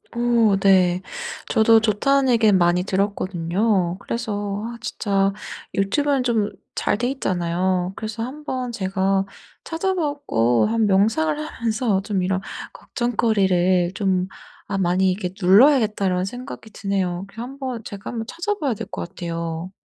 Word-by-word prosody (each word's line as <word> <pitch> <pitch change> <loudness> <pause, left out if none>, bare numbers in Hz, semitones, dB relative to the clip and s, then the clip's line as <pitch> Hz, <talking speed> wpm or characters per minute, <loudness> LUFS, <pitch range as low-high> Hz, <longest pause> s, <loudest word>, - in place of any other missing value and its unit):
오 235 -3 +3
네. 185 -2 +4 0.5
저도 225 0 +5
좋다는 265 +6 +2
얘기는 220 -4 +4
많이 175 0 +3
들었거든요. 190 -1 0
그래서 205 -3 -3
아 235 +1 -6
진짜 195 -4 0 0.4
유튜브는 270 +7 +1
좀 220 -4 +1 0.3
잘 - - +1
돼 245 - 0
있잖아요. 180 -6 -1
그래서 220 +1 -5
한번 255 -1 -4
제가 195 -2 0 0.4
찾아 375 +4 -1
보고 285 - +1
한 225 0 +1
명상을 190 -6 +2
하 155 +9 -7
해서 220 -3 +1
좀 200 -2 -1
이런 185 +1 0 0.3
'걱정거리를 190 -7 +1
좀 185 -3 0 0.4
아 - - -1
많이 185 0 +2
이렇게 185 -1 -3
눌러야겠다.'라는 200 -3 +4
생각이 245 +1 -8
드네요. 190 -3 -2
그래서 215 +3 -9
한번 260 -2 -5
제가 200 0 -7
한번 225 -2 -4
찾아 345 +5 -2
봐야 275 -7 0
될 - - -6
것 - - -4
같아요. 170 -1 -5
200 Hz, 295 characters per minute, -22 LUFS, 185-235 Hz, 0.5 s, 저도